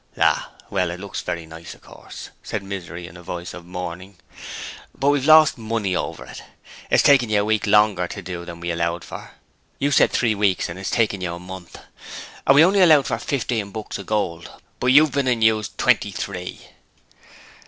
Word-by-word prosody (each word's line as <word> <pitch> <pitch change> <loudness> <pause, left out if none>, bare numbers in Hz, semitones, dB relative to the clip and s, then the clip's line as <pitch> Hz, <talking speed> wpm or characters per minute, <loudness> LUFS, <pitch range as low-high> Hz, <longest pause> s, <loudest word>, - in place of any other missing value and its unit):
'Ah, - - +1 0.2
well, 90 0 0
it 85 +1 -6
looks 100 +1 -5
very 85 -1 -4
nice, 80 +1 -10
of - - -23
course,' - - -11
said 105 -2 -5
Misery 90 -3 -7
in 85 - -12
a 90 - -11
voice 90 0 -6
of 85 -1 -11
mourning, 90 +1 -7 0.8
'but 140 - +2
we've 145 -1 +1
lost 155 -4 +7
money 110 -4 -2
over - - -4
it. - - -10 0.5
It's - - +4
taken 130 -5 +5
you 105 -1 +2
a - - -1
week 110 0 0
longer 105 -4 +3
to 95 - -7
do 90 -1 -6
than 85 -1 -9
we 85 0 -3
allowed 85 +1 -2
for; - - -9 0.5
you 145 +1 0
said - - +5
three 115 -3 +1
weeks 100 -3 +1
and 85 +2 -7
it's 95 - -4
taken 110 -5 0
you 85 -2 -3
a - - -9
month; 90 -1 -10 0.7
and 135 - +6
we 155 +3 +8
only 195 +2 +3
allowed 155 -6 +6
for 115 - -2
fifteen 115 -6 -2
books 110 0 -6
of 100 - -9
gold, 85 -6 -2 0.3
but 125 - -1
you've 145 +3 +6
been 140 0 0
and 120 -3 +1
used 110 -2 +1
twenty - - +2
three.' 90 -2 -6
100 Hz, 200 wpm, -22 LUFS, 90-115 Hz, 0.8 s, we